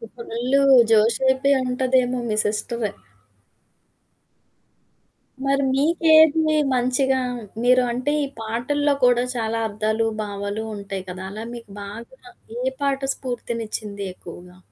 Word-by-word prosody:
Full 245 +3 0 0.3
జోషేపి 260 +5 +3
అంటదేమో 255 0 +1
మీ 215 - -1
sister. 215 0 -2 2.5
మరి 275 0 +2
మీకేది 315 +1 +4 0.2
మంచిగా 255 +2 +1 0.4
మీరు 250 +1 +5
అంటే 255 +4 -1
ఈ - - -2
పాటల్లో 255 +6 0
కూడా 245 0 +4
చాలా 225 -1 -1
అర్థాలు, 215 +2 -1 0.2
భావాలు 205 +1 -4
ఉంటాయి 195 -2 -6
కదా! 185 +1 -7
అలా 215 +2 -7
మీకు 230 -4 -10
బాగా 230 - -9 0.4
ఏ 260 - -1
పాట 275 -1 +1 0.2
స్ఫూర్తినిచ్చింది 225 -5 -5
ఎక్కువగా? 180 0 -12
240 Hz, 100 wpm, -22 LUFS, 215-265 Hz, 2.5 s, మీరు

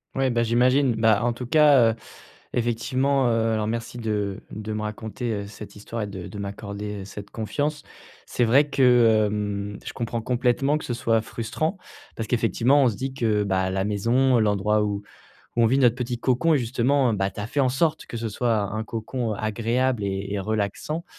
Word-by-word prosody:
Ouais, 135 -1 +1
bah 120 - +1
j'imagine, 125 +2 +3
bah, 110 -1 +3
en 120 - +1
tout 125 +1 -6
cas, 140 -4 +5
heu, 110 - -5 0.6
effectivement, 130 +3 +1
heu, 115 -1 +1
alors 110 -1 -1
merci 115 +2 -4
de 105 -3 -2
de 110 +1 -5
me 105 0 -3
raconter, 110 +2 -4
heu, 100 -1 -3
cette 105 0 -10
histoire 110 +2 -6
et 105 - -2
de 95 -3 -7
de 105 - -9
m'accorder, 100 +1 -5
heu, 95 - -7
cette 100 +1 -9
confiance. 145 +7 -2 0.4
C'est 120 - 0
vrai 140 +5 +4
que, 120 -5 +5
hem, 100 -1 -3
je - - -6
comprends 115 0 -3
complètement 125 +5 +1
que - - -9
ce 120 - -3
soit 115 -2 +1
frustrant, 155 - -3 0.4
parce 110 -1 -5
qu'effectivement, 125 +4 +3
on - - +5
se 115 - -2
dit 130 +6 -4
que, 110 -5 +1
bah, 95 -1 0
la 95 0 -1
maison, 120 +5 +2
l'endroit 105 0 +2
où 100 -1 -2 0.5
où 115 - +4
on - - +6
vit 130 +4 +2
notre 120 -4 +4
petit 125 -1 -3
cocon 130 +7 +2
et - - +3
justement, 125 +1 +1
heu, - - -1
bah, 95 0 0
tu - - -15
as 105 - -3
fait 145 - -1
en 130 - +3
sorte 155 +5 0
que - - -7
ce 115 0 -3
soit 115 +1 0 0.2
un 110 - -2
cocon 115 +1 -3
agréable 115 +3 0
et 100 0 -3
et 100 - -1
relaxant. 110 - -2
115 Hz, 205 wpm, -24 LUFS, 105-125 Hz, 0.6 s, on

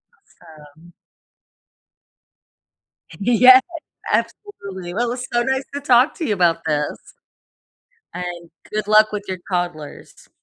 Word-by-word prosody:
Awesome. 160 - -19 2.3
Yeah. 250 +4 +7 0.5
Absolutely. 195 - -4
Well, 240 +4 0
it - - -2
was 250 0 -5
so 240 0 +1
nice 265 +1 -1
to 285 - -3
talk 255 0 +4
to 325 - -4
you 210 - 0
about 175 -3 +1
this. 150 -1 -1 1.2
And 175 -1 -7 0.2
good 210 -1 -3
luck 215 0 +5
with 205 -1 -4
your 185 -1 -5
toddlers. 175 -5 -5
200 Hz, 115 wpm, -20 LUFS, 175-245 Hz, 2.3 s, Yeah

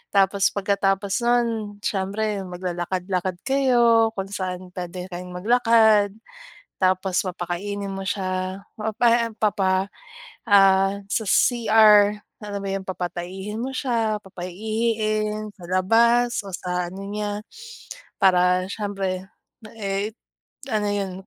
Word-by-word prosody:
Tapos, 195 0 +4
pagkatapos 200 +1 0
no'n 240 0 +3 0.4
siyempre 200 +1 -1
maglalakad-lakad 180 0 -3
kayo 240 -4 +4
kung 195 0 -3
saan 185 -2 -4
pwede 180 +1 -5
kayong 180 +1 -7
maglakad. 220 -1 +4 0.7
Tapos 185 0 +2
papakainin 190 +3 -4
mo 195 - -5
siya 185 -1 -2 0.2
o 220 0 -3
pahem 235 -1 +3
papa 195 -2 +1 0.6
ah, 195 -1 +5 0.2
sa 220 - 0
CR 215 -4 +5 0.2
ano 205 -1 -5
ba 195 - -4
'yung 195 -1 -3
papataihin 190 +3 -5
mo 265 - -3
siya, 230 -5 0
papaihiin 215 +3 -2
sa 180 - -14
labas 235 +6 +3
o - - -7
sa 180 -1 -3
ano 190 - -9
niya 205 0 -3 0.8
para, 180 -1 +4
syempre, 195 -3 -3 0.5
eh, 200 +1 -2 0.6
ano 210 -1 0
yun 200 -2 -2
200 Hz, 110 wpm, -23 LUFS, 185-215 Hz, 0.8 s, ah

